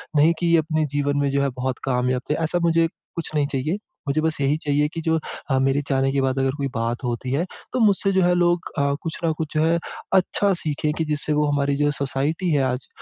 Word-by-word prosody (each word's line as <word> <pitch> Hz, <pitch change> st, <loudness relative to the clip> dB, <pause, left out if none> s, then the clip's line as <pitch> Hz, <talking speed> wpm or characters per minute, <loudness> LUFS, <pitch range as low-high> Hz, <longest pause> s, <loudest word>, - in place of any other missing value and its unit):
नहीं 155 Hz, +3 st, +5 dB
कि 175 Hz, -, 0 dB
ये 170 Hz, 0 st, +5 dB
अपने 155 Hz, 0 st, 0 dB
जीवन 145 Hz, 0 st, 0 dB
में 140 Hz, -1 st, +1 dB
जो 140 Hz, 0 st, +1 dB
है 140 Hz, -, +1 dB
बहुत 130 Hz, 0 st, -1 dB
कामयाब 125 Hz, -1 st, 0 dB
थे।" -, -, +4 dB
ऐसा 175 Hz, +3 st, +1 dB
मुझे 165 Hz, 0 st, +3 dB, 0.3 s
कुछ 170 Hz, -, -4 dB
नहीं 145 Hz, -1 st, +2 dB
चाहिए। 150 Hz, +7 st, -1 dB, 0.3 s
मुझे 150 Hz, +3 st, +1 dB
बस 160 Hz, -2 st, 0 dB
यही 140 Hz, +3 st, +2 dB
चाहिए 145 Hz, +1 st, +2 dB
की 165 Hz, -, -4 dB
जो 160 Hz, 0 st, +1 dB, 0.3 s
अ, 130 Hz, -, +3 dB
मेरे 135 Hz, +2 st, +2 dB
जाने 135 Hz, 0 st, +2 dB
के 140 Hz, -1 st, +1 dB
बाद 135 Hz, 0 st, 0 dB
अगर 135 Hz, 0 st, +2 dB
कोई 140 Hz, -1 st, -1 dB
बात 115 Hz, +2 st, -2 dB
होती 125 Hz, +1 st, -3 dB
है, 165 Hz, +6 st, +1 dB, 0.3 s
तो 255 Hz, -, 0 dB
मुझसे 195 Hz, -1 st, +3 dB
जो 190 Hz, -1 st, +3 dB
है 180 Hz, 0 st, +4 dB
लोग 175 Hz, 0 st, +1 dB
अ, 140 Hz, 0 st, +2 dB
कुछ 160 Hz, -1 st, -4 dB
न 160 Hz, -, +3 dB
कुछ 160 Hz, -1 st, -4 dB
जो 155 Hz, -, +3 dB
है, 170 Hz, +1 st, +2 dB, 0.3 s
अच्छा 195 Hz, +1 st, +3 dB
सीखें 150 Hz, 0 st, -1 dB
कि 160 Hz, -, 0 dB
जिससे 150 Hz, 0 st, 0 dB
वो 150 Hz, 0 st, +2 dB
हमारी 140 Hz, 0 st, +1 dB
जो 145 Hz, -, +3 dB
सोसाइटी 145 Hz, +6 st, -1 dB
है 140 Hz, -2 st, +3 dB
आज 125 Hz, 0 st, -5 dB
145 Hz, 245 wpm, -23 LUFS, 135-165 Hz, 0.3 s, नहीं